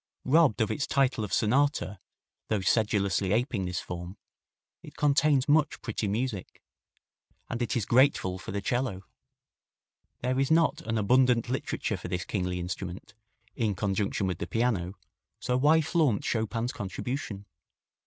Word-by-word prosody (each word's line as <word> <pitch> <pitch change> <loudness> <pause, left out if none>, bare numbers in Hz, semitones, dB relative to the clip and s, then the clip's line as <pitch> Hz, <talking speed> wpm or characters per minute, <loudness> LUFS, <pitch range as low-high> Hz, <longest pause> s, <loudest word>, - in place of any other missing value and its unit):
Robbed 140 -5 +4
of 110 - +1
its 145 - -2
title 135 -5 +1
of 105 - -5
sonata 120 -4 +1 0.5
though 105 -3 0
sedulously 100 -2 +1
aping 115 -4 0
this 90 0 -2
form 90 +2 -7 0.6
it - - -13
contains 145 -2 +3
much 150 0 +3
pretty 115 -3 -2
music. 110 -1 -3 0.9
And 120 - -3
it 120 - 0
is 110 - -1
grateful 120 -8 +3
for - - -7
the 100 +1 -2
'cello. 120 -6 -1 1.2
There 130 +1 0
is 135 - +1
not 160 -1 +3
an 115 0 0
abundant 125 +2 +3
literature 130 - -2
for - - -7
this 90 -1 -3
kingly 90 -3 -2
instrument, 90 +1 -6 0.4
in 110 -4 0
conjunction 100 0 -1
with 90 -2 -2
the 85 - -4
piano, 105 -6 0 0.4
so 125 - -1
why 150 +5 +4
flaunt 150 - +1
Chopin's 115 +2 -1
contribution? 105 0 -5
115 Hz, 145 wpm, -28 LUFS, 95-130 Hz, 1.2 s, Robbed